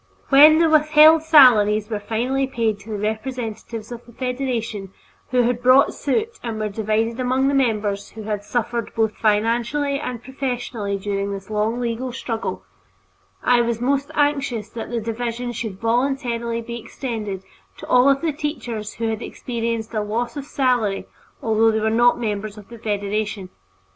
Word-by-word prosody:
When 300 +3 +8
the 330 0 +4
withheld 310 +1 +6
salaries 225 -9 +6
were 215 -2 -3
finally 245 +6 -1
paid 230 -5 -1
to 200 - -14
the 215 - -3
representatives 220 +1 -4
of 240 0 -7
the - - -13
Federation 240 -6 -3 0.4
who 250 -1 +3
had 240 0 0
brought 255 +3 +5
suit 440 - -2
and 230 -2 -4
were 215 0 -1
divided 220 +3 -1
among 255 +1 +1
the 280 - +1
members 215 -6 0
who 220 - -9
had 210 -1 -3
suffered 235 +1 -3
both 220 -1 +1
financially 235 +7 +1
and 250 -5 -5
professionally 245 -6 -3
during 200 0 -2
this 195 +1 -7
long 215 +3 0
legal 245 +1 -2
struggle, 225 - -4 0.8
I 245 -1 +4
was 235 -1 -1
most 275 +3 0
anxious 275 -7 0
that 230 - -6
the 235 -1 -2
division 235 +2 -3
should 220 -5 -5
voluntarily 235 -1 -1
be 235 +1 -6
extended 215 -6 -5 0.3
to - - -9
all 250 +2 +5
of 275 0 +2
the 325 -2 0
teachers 250 -8 -4
who 230 0 -2
had 220 0 -3
experienced 230 -2 -4
a 215 - 0
loss 225 +5 -2
of 285 -2 -5
salary 245 -8 0 0.4
although 225 -1 +3
they 220 0 +1
were 220 0 0
not 240 +2 +4
members 210 -2 -3
of 205 -2 -13
the 235 -1 -11
Federation. 205 -2 -2
230 Hz, 165 wpm, -22 LUFS, 215-255 Hz, 0.8 s, When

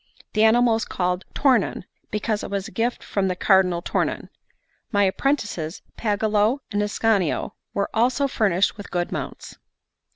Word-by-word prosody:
The 215 - +3
animal 235 +1 +5
was 225 0 0
called 180 0 -2
Tornon, 255 -11 +2 0.3
because 210 0 -1
it - - -5
was 200 -1 -2
a - - -11
gift 230 +5 -1
from 195 -2 -1
the 185 - -1
Cardinal 180 -2 +3
Tornon. - - -1 0.6
My 205 -2 +3
apprentices, 195 - -1
Pagolo 215 +2 +1
and 205 -1 0
Ascanio, 205 -4 +1 0.2
were 200 - +1
also 250 +5 +2
furnished 200 -7 +1
with 205 - -9
good 175 -1 -2
mounts. - - -6
205 Hz, 150 wpm, -23 LUFS, 190-225 Hz, 0.6 s, animal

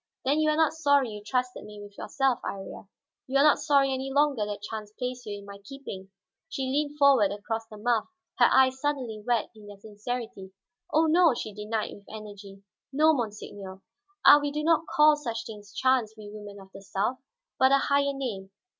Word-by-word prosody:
"Then 285 +3 +2
you 310 0 +3
are 305 - +2
not 320 -1 +3
sorry 285 -5 +2
that - - -8
you 210 0 -9
trusted 250 +2 -2
me 210 0 -11
with 205 0 -12
yourself, 270 +1 0
Iría? 195 0 -7 0.4
You 265 +1 +1
are 275 - +5
not 300 -1 +5
sorry 280 -2 +3
any 265 +1 -4
longer 280 -6 +2
that 205 -1 -6
chance 215 0 -6
placed 250 -1 -5
you 205 -1 -4
in 200 - -12
my 200 0 -10
keeping?" 200 -6 -9 0.4
She 270 - -4
leaned 290 +3 -1
forward 270 -9 +5
across 225 +2 -4
the 215 -1 -12
muff, 230 +1 0 0.3
her - - +7
eyes 260 0 +4
suddenly 255 -7 -2
wet 235 -1 0
in 210 -1 -14
their 205 -1 -11
sincerity. 210 -1 -6 0.4
"Oh, 315 +1 +4
no," 325 -3 +4
she 215 -2 -5
denied 215 +1 -3
with 200 - -15
energy. 205 -2 -10 0.3
"No, 310 +3 +4
monseigneur. 205 -6 -6 0.4
Ah, 290 - +10
we 290 0 -2
do 300 +1 -3
not 325 0 +2
call 300 0 +5
such 235 -6 -5
things 205 -2 -10
chance, 245 -2 +1
we 210 -1 -10
women 205 -1 -10
of 190 0 -15
the 195 - -10
South, 200 +6 -2 0.4
but 260 0 +5
a 275 - +6
higher 280 0 +1
name! 230 -9 -5
235 Hz, 200 wpm, -27 LUFS, 205-280 Hz, 0.4 s, Ah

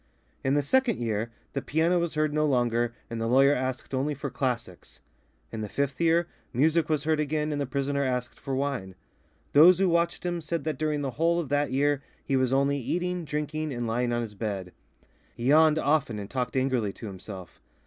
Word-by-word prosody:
In 135 +1 +2
the 145 - +2
second 250 - +2
year 115 -1 -1 0.2
the 140 - -2
piano 165 +5 +2
was 170 -2 -2
heard 155 -1 +1
no 150 0 +2
longer 120 -3 +1
and 115 -1 -5
the 115 - 0
lawyer 135 +4 +5
asked 130 0 -3
only 140 +3 0
for 140 0 -5
classics. 120 -7 -4 0.5
In 110 - -5
the 105 - -4
fifth 140 +3 -2
year, 170 +1 +3 0.3
music 155 +5 +2
was 150 -2 +1
heard 155 0 +1
again, 150 0 -1
and 145 -1 -1
the 140 - -2
prisoner 140 +1 -1
asked 125 -2 -2
for 135 -2 -3
wine. 130 -9 -2 0.6
Those 165 +5 +8
who 195 0 +3
watched 170 0 +1
him 175 -1 -1
said 165 +2 -3
that 155 -4 -3
during 155 -1 0
the 135 -2 -2
whole 170 +1 +3
of 160 -6 -4
that 145 -1 +1
year 145 +1 +2 0.2
he 135 - 0
was 130 -1 +2
only 140 +1 +2
eating, 180 +5 -2
drinking, 150 +1 -3
and 120 -2 -3
lying 120 +2 0
on 120 0 0
his 110 -2 -7
bed. 100 -4 -4 0.7
He 120 - -6
yawned 155 +1 +6
often 145 -7 +1
and 100 -1 -5
talked 125 +3 -3
angrily 130 -6 +1
to - - -10
himself. 95 -2 -9
140 Hz, 205 wpm, -27 LUFS, 120-155 Hz, 0.7 s, Those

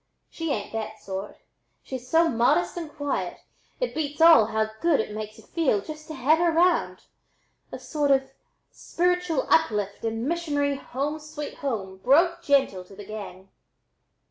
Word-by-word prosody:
She 330 -1 -4
ain't 210 -5 -3
that 220 -1 -4
sort. 195 +1 -6 0.5
She's 255 -1 -7
so 330 +3 +4
modest 230 - +2
and 330 -3 -6
quiet 285 -2 -3 0.4
it - - -1
beats 295 -1 -3
all 325 -9 +8
how 220 -1 -1
good 335 -4 +3
it 215 -1 -2
makes 215 0 -6
y'u - - -15
feel 305 -11 +1
just 305 +8 -9
to 315 - -7
have 285 +5 +3
her 345 -1 +3
round; 350 +2 +2 0.7
a - - -5
sort 295 -2 -1
of 270 -1 +2 0.4
spiritual 360 -4 0
uplift 205 -9 +2
and 225 +2 -2
missionary 290 -4 0
'home 280 +3 -3
sweet 300 -1 -7
home' 205 -9 -3
broke 335 - +3
gentle 275 - +2
to 195 - -15
the 205 0 -10
gang." 195 -2 -8
280 Hz, 160 wpm, -26 LUFS, 215-320 Hz, 0.7 s, all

